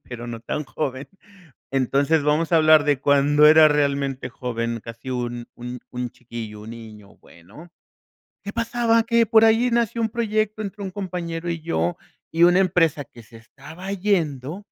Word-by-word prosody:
pero 120 Hz, -1 st, -8 dB
no 115 Hz, -1 st, -7 dB
tan 150 Hz, +6 st, -4 dB
joven, 135 Hz, -1 st, -4 dB, 0.7 s
Entonces 140 Hz, +3 st, +1 dB
vamos 150 Hz, +3 st, +1 dB
a -, -, +7 dB
hablar 155 Hz, -1 st, +6 dB
de 145 Hz, -3 st, +1 dB
cuando 145 Hz, +1 st, +4 dB
era 155 Hz, 0 st, +8 dB
realmente 140 Hz, -3 st, -1 dB
joven 115 Hz, -2 st, -4 dB
casi 115 Hz, +2 st, -9 dB
un 120 Hz, -1 st, -4 dB
un 125 Hz, +1 st, -7 dB
un 125 Hz, 0 st, -4 dB
chiquillo, 115 Hz, -3 st, -9 dB
un 110 Hz, -, -10 dB
niño, 110 Hz, -3 st, -12 dB
bueno. 105 Hz, -, -16 dB, 0.7 s
¿Qué 205 Hz, -, -6 dB
pasaba? 230 Hz, 0 st, +1 dB
Que 230 Hz, 0 st, +2 dB
por 225 Hz, 0 st, +5 dB
ahí 225 Hz, +2 st, +3 dB
nació 235 Hz, -1 st, 0 dB
un 225 Hz, -, +1 dB
proyecto 215 Hz, -1 st, -1 dB
entre 200 Hz, 0 st, -7 dB
un 190 Hz, -, -4 dB
compañero 175 Hz, -3 st, -5 dB
y 170 Hz, -1 st, -4 dB
yo, 90 Hz, -, -1 dB, 0.3 s
y 165 Hz, +1 st, +3 dB
una 175 Hz, +2 st, +5 dB
empresa 165 Hz, -6 st, +1 dB
que 120 Hz, -1 st, -16 dB
se 115 Hz, +1 st, -16 dB
estaba 155 Hz, +11 st, -11 dB
yendo 175 Hz, -4 st, -1 dB
150 Hz, 165 wpm, -22 LUFS, 125-190 Hz, 0.7 s, era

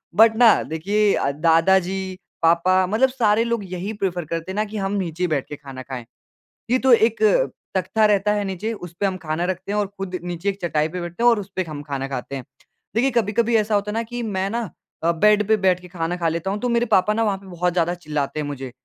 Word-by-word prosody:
But 225 Hz, +1 st, +6 dB
ना 235 Hz, -3 st, +8 dB
देखिए 200 Hz, +6 st, +1 dB
अ, 140 Hz, -, 0 dB
दादा 165 Hz, +5 st, +4 dB
जी, 190 Hz, 0 st, -4 dB, 0.2 s
पापा, 180 Hz, +3 st, +4 dB
मतलब 235 Hz, +7 st, +3 dB
सारे 230 Hz, -3 st, +2 dB
लोग 235 Hz, -3 st, -1 dB
यही 190 Hz, +5 st, -4 dB
प्रिफर 180 Hz, -5 st, -2 dB
करते 165 Hz, +3 st, -4 dB
हैं -, -, -6 dB
ना 215 Hz, +1 st, 0 dB
कि 215 Hz, +1 st, -7 dB
हम 195 Hz, -1 st, -2 dB
नीचे 180 Hz, -2 st, -1 dB
बैठ 150 Hz, -5 st, -1 dB
के 150 Hz, -, -5 dB
खाना 135 Hz, -3 st, -9 dB
खाएँ। 130 Hz, -3 st, -7 dB, 0.7 s
ये 255 Hz, -, +4 dB
तो 260 Hz, -1 st, +3 dB
एक 225 Hz, -, +4 dB, 0.5 s
तख्ता 190 Hz, +4 st, +1 dB
रहता 210 Hz, 0 st, +2 dB
है 205 Hz, -1 st, 0 dB
नीचे, 195 Hz, +4 st, -3 dB
उसपे 180 Hz, -1 st, -4 dB
हम 190 Hz, -1 st, -1 dB
खाना 155 Hz, +2 st, -2 dB
रखते 185 Hz, +2 st, -3 dB
हैं 210 Hz, -, 0 dB
और 205 Hz, -, +1 dB
खुद 195 Hz, -1 st, -5 dB
नीचे 175 Hz, +2 st, -4 dB
एक 200 Hz, 0 st, -2 dB
चटाई 155 Hz, -3 st, 0 dB
पे 180 Hz, +2 st, -5 dB
बैठते 175 Hz, +6 st, -5 dB
हैं 240 Hz, -, +7 dB
और 230 Hz, -3 st, +2 dB
उसपे 190 Hz, -1 st, -4 dB
हम 145 Hz, -1 st, -6 dB
खाना 140 Hz, -2 st, -4 dB
खाते 135 Hz, 0 st, -5 dB
हैं, 130 Hz, -, -6 dB, 0.5 s
देखिए 255 Hz, +4 st, +2 dB
कभी-कभी 230 Hz, 0 st, +1 dB
ऐसा 215 Hz, 0 st, +1 dB
होता 205 Hz, 0 st, 0 dB
है -, -, -4 dB
ना 230 Hz, -, 0 dB
कि 240 Hz, +1 st, -6 dB
मैं 195 Hz, -3 st, -1 dB
ना 230 Hz, -6 st, -3 dB, 0.3 s
अ, 170 Hz, +1 st, +3 dB
बेड 210 Hz, +4 st, +3 dB
पे 220 Hz, -, +5 dB
बैठ 185 Hz, -2 st, +2 dB
के 180 Hz, -, -13 dB
खाना 175 Hz, 0 st, -3 dB
खा 170 Hz, -2 st, 0 dB
लेता 170 Hz, +4 st, -2 dB
हूँ 205 Hz, -, -2 dB
तो 245 Hz, -, -1 dB
मेरे 235 Hz, 0 st, +2 dB
पापा 210 Hz, -1 st, +3 dB
ना 225 Hz, -, +1 dB
वहाँ 200 Hz, -3 st, 0 dB
पे 195 Hz, -, -16 dB
बहुत 180 Hz, -1 st, -1 dB
ज़्यादा 175 Hz, 0 st, +1 dB
चिल्लाते 150 Hz, -3 st, -3 dB
हैं 150 Hz, -, -3 dB
मुझे, 135 Hz, -3 st, -6 dB
190 Hz, 245 wpm, -22 LUFS, 165-210 Hz, 0.7 s, ना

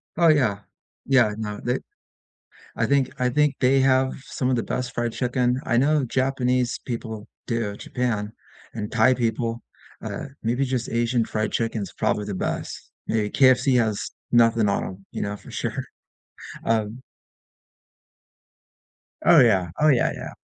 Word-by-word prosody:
Oh, 170 Hz, 0 st, +4 dB
yeah. 125 Hz, -10 st, +3 dB, 0.5 s
Yeah, 125 Hz, -6 st, +4 dB
no, 105 Hz, -2 st, -4 dB
they 125 Hz, +2 st, 0 dB, 1.0 s
I -, -, +1 dB
think 140 Hz, -2 st, +2 dB
I 125 Hz, 0 st, +2 dB
think 150 Hz, +2 st, +2 dB
they 135 Hz, +1 st, +4 dB
have 130 Hz, 0 st, +3 dB
some 130 Hz, -1 st, -2 dB
of 130 Hz, -, +2 dB
the 115 Hz, -, -1 dB
best 125 Hz, -1 st, -3 dB
fried 120 Hz, 0 st, -1 dB
chicken. 125 Hz, 0 st, 0 dB
I 120 Hz, -, +1 dB
know 145 Hz, +2 st, +3 dB
Japanese 125 Hz, -1 st, 0 dB
people 110 Hz, -3 st, -5 dB, 0.2 s
do, 115 Hz, -4 st, -2 dB
Japan 110 Hz, -3 st, -2 dB, 0.4 s
and 105 Hz, -2 st, -5 dB
Thai 120 Hz, +3 st, +4 dB
people. 115 Hz, -1 st, -1 dB, 0.4 s
Uh, -, -, -5 dB, 0.2 s
maybe 120 Hz, +4 st, +1 dB
just 125 Hz, -2 st, -2 dB
Asian 120 Hz, 0 st, +1 dB
fried 110 Hz, 0 st, -2 dB
chicken's 115 Hz, -4 st, -2 dB
probably 105 Hz, -, -1 dB
the 100 Hz, -, -4 dB
best. -, -, -4 dB, 0.2 s
A 110 Hz, -2 st, 0 dB
KFC 130 Hz, 0 st, +4 dB
has 110 Hz, -4 st, 0 dB, 0.2 s
nothing 115 Hz, -3 st, +4 dB
on 100 Hz, -, 0 dB
'em, 95 Hz, +1 st, -9 dB
you -, -, -4 dB
know, 105 Hz, 0 st, -2 dB
for -, -, -13 dB
sure, -, -, -3 dB, 0.8 s
um 110 Hz, +2 st, -1 dB, 2.2 s
Oh, -, -, +8 dB
yeah. 95 Hz, -7 st, +4 dB
Oh, 155 Hz, -, +4 dB
yeah, 130 Hz, -5 st, +3 dB
yeah. -, -, -7 dB
120 Hz, 150 wpm, -24 LUFS, 110-130 Hz, 2.2 s, Oh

